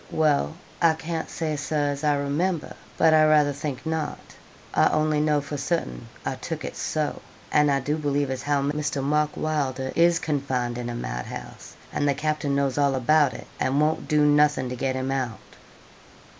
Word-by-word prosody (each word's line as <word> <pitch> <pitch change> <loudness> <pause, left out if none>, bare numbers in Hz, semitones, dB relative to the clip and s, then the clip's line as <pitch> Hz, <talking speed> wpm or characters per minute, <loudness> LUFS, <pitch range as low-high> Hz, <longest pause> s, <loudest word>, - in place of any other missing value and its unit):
'Well, 155 0 +1 0.3
I 165 -2 +5
can't 160 0 -4
say, 155 -2 -2
Sir, 145 0 0
as 140 +1 -5
I 150 -1 +3
remember; 150 +4 -1 0.2
but 160 -1 +5
I 155 - +6
rayther 150 -2 +4
think 140 -2 -5
not. 160 -1 -2 0.6
I - - +5
only 155 -1 +1
know 150 -1 +2
for 145 +1 -5
certain, 140 - -2 0.2
I - - -1
took - - -5
it - - -6
so; 155 -2 -2 0.3
and 150 -1 +4
I 140 -1 +2
do 145 +4 -1
believe 145 -2 0
as 130 -1 -3
how 145 0 +1
Mr. 145 -1 -1
Mark 150 +1 +1
Wylder 135 -4 -1
is 170 0 +4
confined 130 -6 -2
in 120 0 -4
a 120 - -4
mad - - -4
house, - - -9 0.2
and 145 - +1
the 140 - +2
captain 150 -1 -1
knows 140 0 0
all 140 -1 +3
about 145 +2 +3
it, - - -9
and 135 +2 +1
won't 155 +1 +1
do 150 -1 +3
nothing 150 -3 +3
to 125 - -4
get 130 +1 -1
him 130 +1 -2
out.' 130 -5 -2
145 Hz, 190 wpm, -25 LUFS, 135-155 Hz, 0.6 s, I